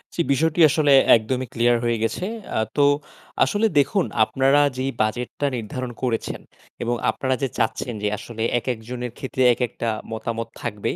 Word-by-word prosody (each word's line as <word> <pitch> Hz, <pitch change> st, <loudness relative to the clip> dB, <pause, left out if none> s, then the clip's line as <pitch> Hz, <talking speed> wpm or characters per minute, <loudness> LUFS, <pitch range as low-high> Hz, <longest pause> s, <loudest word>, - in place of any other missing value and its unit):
জি, -, -, +1 dB
বিষয়টি 160 Hz, +4 st, +1 dB
আসলে 150 Hz, -1 st, +3 dB, 0.2 s
একদমই 125 Hz, +3 st, -1 dB
ক্লিয়ার 120 Hz, +1 st, +3 dB
হয়ে 120 Hz, -1 st, +1 dB
গেছে। 115 Hz, +10 st, -1 dB, 0.3 s
আ -, -, +2 dB, 0.2 s
তো 145 Hz, -, +5 dB, 0.6 s
আসলে 210 Hz, +2 st, +2 dB
দেখুন 180 Hz, +6 st, +2 dB, 0.2 s
আপনারা 135 Hz, +6 st, +3 dB, 0.2 s
যেই 130 Hz, +1 st, -1 dB
বাজেটটা 120 Hz, +6 st, -2 dB
নির্ধারণ 120 Hz, +3 st, -5 dB
করেছেন, 120 Hz, -3 st, -2 dB, 0.4 s
এবং 120 Hz, +1 st, 0 dB
আপনারা 130 Hz, -1 st, -1 dB
যে -, -, +2 dB
চাচ্ছেন 120 Hz, +2 st, -1 dB
যে -, -, +2 dB
আসলে 110 Hz, +1 st, -6 dB, 0.2 s
একেকজনের 120 Hz, 0 st, -5 dB
ক্ষেত্রে, 130 Hz, -1 st, -2 dB
একেকটা 120 Hz, -1 st, -2 dB, 0.2 s
মতামত 115 Hz, +1 st, -4 dB
থাকবেই, 105 Hz, -4 st, -3 dB
125 Hz, 150 wpm, -23 LUFS, 115-135 Hz, 0.6 s, তো